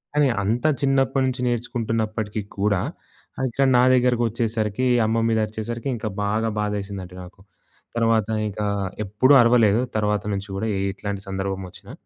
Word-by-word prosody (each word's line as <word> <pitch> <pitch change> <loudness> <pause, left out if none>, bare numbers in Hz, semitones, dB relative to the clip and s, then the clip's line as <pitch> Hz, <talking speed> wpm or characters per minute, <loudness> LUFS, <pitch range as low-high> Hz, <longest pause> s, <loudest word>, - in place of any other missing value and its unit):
కానీ 150 -1 +4 0.2
అంత 115 +7 0 0.2
చిన్నప్పటి 135 0 +2
నుంచి 125 0 -4
నేర్చుకుంటున్నప్పటికీ 110 -3 -2 0.2
కూడా 100 -2 +2 0.6
ఆహ్, 130 - 0
ఇక్కడ 135 +4 +1
నా - - +6
దగ్గరకొచ్చేసరికి 120 -2 +1 0.2
అమ్మ 110 +1 +1
మీద 110 -1 +2
అరిచేసరికి 115 +4 -5
ఇంకా 110 -1 -4 0.2
బాగా 110 +2 0
బాధేసిందండి 100 -3 -4
నాకు. 90 +1 -14 0.5
తర్వాత 115 -2 +2 0.2
ఇక 105 +1 -6 0.4
ఎప్పుడూ 105 +8 +3
అరవలేదు 115 -2 +4 0.2
తర్వాత 105 -1 0
నుంచి 100 +1 -4
కూడా 110 +3 -2
ఏట్లాంటి 100 +1 -3
సందర్భం 95 0 -3
ఒచ్చినా. - - -13
110 Hz, 135 wpm, -23 LUFS, 100-120 Hz, 0.6 s, నా